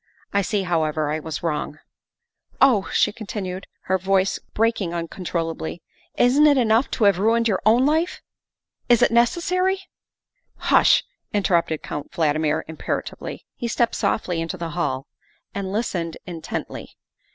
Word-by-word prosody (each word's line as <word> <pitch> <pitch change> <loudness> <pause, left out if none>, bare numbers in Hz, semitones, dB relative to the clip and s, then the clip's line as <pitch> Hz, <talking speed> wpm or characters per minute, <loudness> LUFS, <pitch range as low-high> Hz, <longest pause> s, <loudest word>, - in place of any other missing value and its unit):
I 200 - +3
see, 200 +1 -1
however, 155 -4 0
I 155 - -1
was 160 0 -6
wrong. 155 -2 -2 0.3
' - - -67
' - - -61
" - - -63
Oh," 240 -8 +4
she - - +3
continued, 195 -4 -5
her 190 0 0
voice 190 +1 +1 0.2
breaking 215 -6 +1
uncontrol 165 -1 -3
lably, 160 +2 -6 0.2
" - - -35
isn't 285 +5 +5
it 290 -2 +5
enough 230 +1 +3
to 230 - +1
have 200 -3 +4
ruined 230 +3 +3
your 195 -4 0
own 240 +4 +5
life? 320 +4 +1 0.7
Is 240 -2 +5
it - - +4
necessary 360 +11 +2 0.3
" - - -67
" - - -49 0.2
Hush," - - +6 0.3
interrupted 170 -5 +1
Count 145 - -6
Valdmir 155 -2 +1
imperatively. 160 - -5
He 240 - -4
stepped 235 0 +1
softly 175 -6 0
into 165 +3 -4
the 170 -1 -4
hall 135 -6 -2 0.5
and 195 -1 -4
listened 180 -6 -2
intently. 165 -3 -6
190 Hz, 160 wpm, -23 LUFS, 165-230 Hz, 0.7 s, Hush